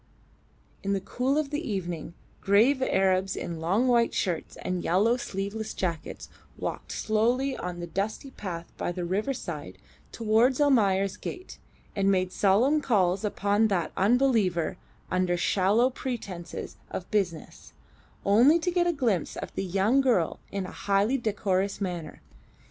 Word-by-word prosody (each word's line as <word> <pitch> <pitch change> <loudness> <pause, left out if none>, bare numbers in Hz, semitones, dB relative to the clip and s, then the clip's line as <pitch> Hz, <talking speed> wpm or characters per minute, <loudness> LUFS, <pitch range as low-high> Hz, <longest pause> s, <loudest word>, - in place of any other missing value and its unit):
In 200 -1 -1
the 195 - +1
cool 250 +8 -1
of 300 -2 -1
the 295 +1 -1
evening 175 - -4 0.3
grave 230 +8 +4
Arabs 190 -5 +2
in 170 -2 -5
long 195 +10 +1
white 235 -2 +3
shirts 175 -5 -2
and 180 -1 -2
yellow 205 +7 +3
sleeveless 210 -1 -4
jackets 170 -4 -4 0.3
walked - - -5
slowly 245 +5 +1
on 180 -1 -5
the 175 - -4
dusty 205 +9 -3
path 175 -8 -6
by - - -2
the 175 0 -4
riverside 210 +9 -3 0.3
towards 230 +4 +2
Almayer's 200 -9 +3
gate, 370 0 -8 0.4
and 195 -1 +2
made 185 -1 +1
solemn 235 +12 +3
calls 195 -7 +2
upon 205 +1 +2
that 180 -6 -1
Unbeliever 205 -6 +2 0.4
under 185 -1 +1
shallow 205 +8 +2
pretences 205 -10 -6
of 180 - -6
business, 185 -7 -2 0.5
only 240 +11 +6
to 360 +2 -1
get 350 0 +2
a 345 - +2
glimpse 230 - -1
of - - -6
the - - -2
young 195 +8 +2
girl 230 -12 +1
in 195 -2 -3
a - - -7
highly 200 +5 +1
decorous 200 -3 -1
manner. 175 -5 -5
200 Hz, 145 wpm, -27 LUFS, 185-245 Hz, 0.5 s, only